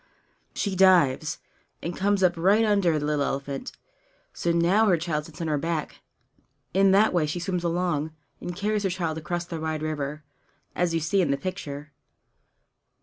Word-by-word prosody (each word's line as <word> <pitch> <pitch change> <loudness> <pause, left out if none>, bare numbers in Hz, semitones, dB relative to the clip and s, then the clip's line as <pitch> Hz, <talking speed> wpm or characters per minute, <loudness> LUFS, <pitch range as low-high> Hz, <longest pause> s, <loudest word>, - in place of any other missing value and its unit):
She 200 -2 -1
dives, 175 -6 +4 0.5
and 170 +1 -3
comes 200 0 +1
up 180 -1 +4
right 195 +7 +3
under 200 -7 +3
the 145 - -2
little 150 -1 +1
elephant; 140 0 -3 0.6
so 170 - -1
now 175 +6 +3
her 180 -4 +4
child 155 -2 -2
sits 165 +2 -11
on 165 - -2
her 150 -2 0
back. 165 0 -3 0.7
In 195 +1 +5
that 200 +2 +4
way 165 -4 +2
she 155 +4 -3
swims 180 0 -2
along, 170 -3 0 0.3
and 175 - -6
carries 210 +2 0
her 195 - 0
child 170 -3 -2
across 175 +2 -3
the 170 -2 -6
wide 155 -1 -3
river, 150 -1 -3 0.5
as 175 -1 +1
you - - +2
see 165 +5 +1
in 170 - +1
the 140 - +1
picture. 150 -3 -6
170 Hz, 175 wpm, -26 LUFS, 155-185 Hz, 0.7 s, In